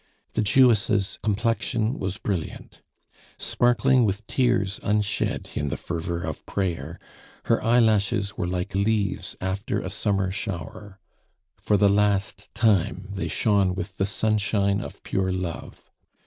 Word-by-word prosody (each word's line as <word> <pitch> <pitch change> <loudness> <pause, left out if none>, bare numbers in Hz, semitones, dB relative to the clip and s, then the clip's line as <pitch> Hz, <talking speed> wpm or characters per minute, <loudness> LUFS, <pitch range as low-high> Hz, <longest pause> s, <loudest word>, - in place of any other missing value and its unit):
The 110 - +1
Jewess' 105 -3 +3
complexion 115 +2 0
was 95 +1 -3
brilliant. 95 -8 -5 0.6
Sparkling 120 +1 +3
with 105 0 -1
tears 115 -6 +1
unshed 105 -1 -1
in 75 - -1
the - - -2
fervor 85 0 -4
of 80 -5 -5
prayer, 85 -4 -2 0.5
her - - +2
eyelashes 110 -3 +2
were 90 - -2
like 90 0 -3
leaves 100 0 0
after 95 +2 -2
a - - -5
summer 95 -2 0
shower, 100 0 -6 0.6
for 105 - +2
the 100 +1 +5
last 100 0 +1
time 100 -3 +1
they 100 - -3
shone 100 -4 +2
with 95 -2 -5
the 95 - +1
sunshine 100 -1 +1
of - - -9
pure 95 -1 0
love. 90 -3 -5
100 Hz, 130 wpm, -25 LUFS, 95-110 Hz, 0.6 s, the